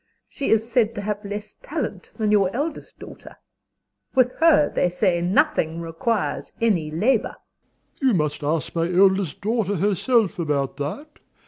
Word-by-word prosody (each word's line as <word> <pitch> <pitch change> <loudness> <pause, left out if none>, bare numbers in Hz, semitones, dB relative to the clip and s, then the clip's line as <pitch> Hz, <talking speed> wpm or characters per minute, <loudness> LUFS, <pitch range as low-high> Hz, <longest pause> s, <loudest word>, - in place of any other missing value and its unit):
She 280 - -4
is 225 0 +2
said 230 -2 +1
to 205 - -4
have 210 +1 -3
less 205 +1 -6
talent - - -5
than 215 -2 0
your 200 -3 +4
eldest 300 +5 -4
daughter. - - -12 0.8
With 255 -1 +4
her, 320 -2 +5
they 180 - +2
say, 180 -1 +1
nothing 175 - +1
requires 170 +7 -2
any 190 -9 +1
labor. 215 +10 +1 0.6
DOMINIE. 270 - +1
You 255 - +4
must 150 -1 -1
ask 150 -1 -1
my 170 +1 0
eldest 190 -2 +2
daughter 210 -1 0
herself 205 +2 +1
about 140 -4 -1
that. 275 - -6
205 Hz, 150 wpm, -23 LUFS, 170-230 Hz, 0.8 s, her